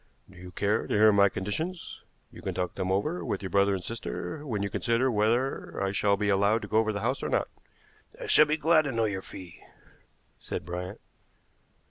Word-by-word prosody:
"Do 95 - -18
you 90 +1 -10
care 105 +4 0
to - - -2
hear 110 +1 +6
my 100 -1 +5
conditions? 160 - -4 0.3
You - - -12
can - - -4
talk 90 -1 -2
them 95 -1 -2
over 150 - -1
with 100 - -3
your 95 - -5
brother 100 0 +3
and 90 - -5
sister 115 - -5
when 105 -5 -2
you 100 - -1
consider 120 +3 +1
whether 115 +5 0
I 95 0 0
shall 100 +1 +2
be 105 0 -1
allowed 100 +3 +2
to - - -5
go 110 - +2
over 110 -1 +1
the 100 -1 -4
house - - -1
or - - -2
not." - - 0 0.7
"I - - -6
shall 150 - +6
be 155 +1 +1
glad 160 0 +4
to 140 - -1
know 115 -2 +1
your 100 -3 -2
fee," 90 -3 -11 0.8
said - - -5
Bryant. 90 +1 -5
105 Hz, 210 wpm, -28 LUFS, 95-115 Hz, 0.8 s, hear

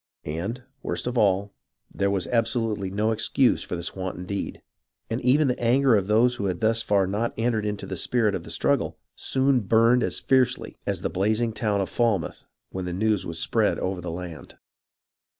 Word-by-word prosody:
And, 95 +12 -4 0.2
worst - - -3
of 125 0 -2
all, 100 -2 +2 0.4
there 100 0 0
was 95 -3 0
absolutely 115 -3 0
no 105 +3 0
excuse 125 +3 +2
for - - -4
this 85 -1 -4
wanton 95 -1 -5
deed, 100 +1 -4 0.5
and 115 - -1
even 135 +4 +4
the 125 - -1
anger 125 +1 +4
of 100 -2 +1
those 120 +3 +3
who 100 - -2
had 90 -3 -1
thus 110 +1 +2
far 100 -3 +2
not 105 +5 -2
entered 115 -2 0
into 105 -1 -4
the 95 - -5
spirit 110 +3 +1
of - - -3
the - - -11
struggle - - 0 0.2
soon 130 0 +2
burned 115 +3 +4
as - - -1
fiercely 130 -2 +1
as - - -1
the - - -2
blazing 110 +4 +1
town 105 -3 0
of 95 - -2
Falmouth 115 -7 -1 0.2
when 95 -1 -4
the 90 - -3
news 105 +2 0
spread 80 - +1
over 95 -1 -2
the 90 - -5
land. 85 -2 -8
110 Hz, 185 wpm, -25 LUFS, 95-120 Hz, 0.5 s, even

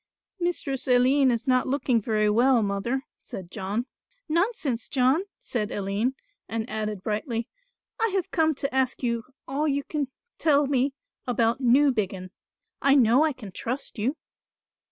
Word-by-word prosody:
"Mistress 325 -7 -1
Aline 260 +2 +4
is 235 0 0
not 255 -2 +2
looking 260 -3 +1
very 215 -1 +1
well, 235 +2 +4
mother," 205 +7 -1 0.2
said 185 -2 -8
John. 210 +4 -2 0.4
"Nonsense, 315 - 0
John," 270 +7 +2 0.2
said 215 -4 -2
Aline, 205 +6 -1 0.3
and 225 0 -2
added 215 -4 -3
brightly, 225 +2 -2 0.5
"I 455 - +3
have 375 -3 -1
come 315 -2 +2
to 275 0 -3
ask 265 0 +1
you 235 -2 -1 0.2
all 285 +3 0
you 280 -1 0
can 290 -1 -2 0.3
tell 290 -2 +4
me 270 0 +1 0.3
about 235 +1 +1
Newbiggin. 235 -8 +2 0.5
I 275 0 +5
know 250 +2 +5
I 315 - +2
can 225 -8 -9
trust 250 +3 -4
you." 260 +9 0
250 Hz, 145 wpm, -26 LUFS, 220-280 Hz, 0.5 s, I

